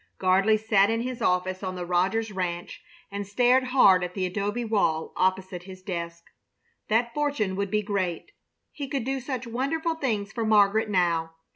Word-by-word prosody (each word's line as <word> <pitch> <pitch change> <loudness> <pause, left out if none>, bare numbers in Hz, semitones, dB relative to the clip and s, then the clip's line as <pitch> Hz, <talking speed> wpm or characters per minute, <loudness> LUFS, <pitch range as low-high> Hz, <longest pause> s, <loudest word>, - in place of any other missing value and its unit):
Gardley 195 +4 +3
sat 210 -2 +3
in 225 0 0
his 250 0 -5
office 185 +1 0
on 185 -2 -4
the 180 -1 -4
Rogers 190 +6 0
ranch 175 -2 -4 0.3
and 200 0 -4
stared 250 +5 +3
hard 200 -8 +5
at 180 0 -5
the 190 -2 -1
adobe 205 +6 -2
wall 180 -8 0
opposite 185 -1 0
his 185 -1 -11
desk. 170 -3 -5 0.7
That 235 +2 +1
fortune 285 -10 -1
would 200 0 -2
be 210 +2 0
great! 195 - -2 0.4
He 285 -2 -6
could 270 -2 -2
do 270 +2 -2
such 255 -1 -4
wonderful 280 +8 -1
things 220 -10 -2
for 230 - -2
Margaret 215 0 +3
now. 170 -4 +1
200 Hz, 170 wpm, -26 LUFS, 185-235 Hz, 0.7 s, hard